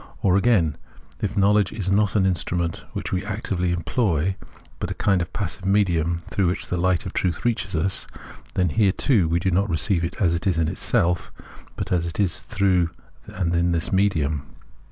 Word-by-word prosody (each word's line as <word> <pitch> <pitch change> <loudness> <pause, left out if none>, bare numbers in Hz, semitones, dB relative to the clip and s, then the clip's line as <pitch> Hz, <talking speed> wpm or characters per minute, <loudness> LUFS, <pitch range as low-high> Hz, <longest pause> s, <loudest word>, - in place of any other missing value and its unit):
Or, 95 -2 +4
again, 95 -7 +3 0.4
if 105 0 -2
knowledge 100 0 +3
is 100 -3 -2
not 105 +1 +2
an 100 -3 +3
instrument 85 -2 -1
wliich - - -4
we 95 - -1
actively 100 -4 -2
employ, 90 - 0 0.4
but - - -3
a - - -4
kind 95 -3 +2
of 85 - -4
passive 100 -2 -4
medium 85 -4 +1
through 95 -3 +1
wliich - - -3
the 90 - -1
light 90 -1 +1
of - - -5
the - - -5
truth 90 +3 -2
reaches 110 -5 0
us, 95 +4 -1 0.5
then 90 -1 +2
here, 100 0 +3
too, 110 - +2
we 85 +1 +2
do 95 +2 0
not 100 +3 +1
receive 85 +1 +2
it 85 +2 -3
as 85 -5 +3
it 85 +3 -2
is 90 -4 +2
in 80 -1 +2
itself, 90 -1 0 0.4
but - - -5
as 85 -2 +1
it 85 - -6
is 95 -4 +1
through 95 -5 +1 0.4
and 90 -2 -2
in 85 +1 +2
this 85 +2 -1
medium. 80 -7 +1
90 Hz, 195 wpm, -23 LUFS, 85-100 Hz, 0.5 s, Or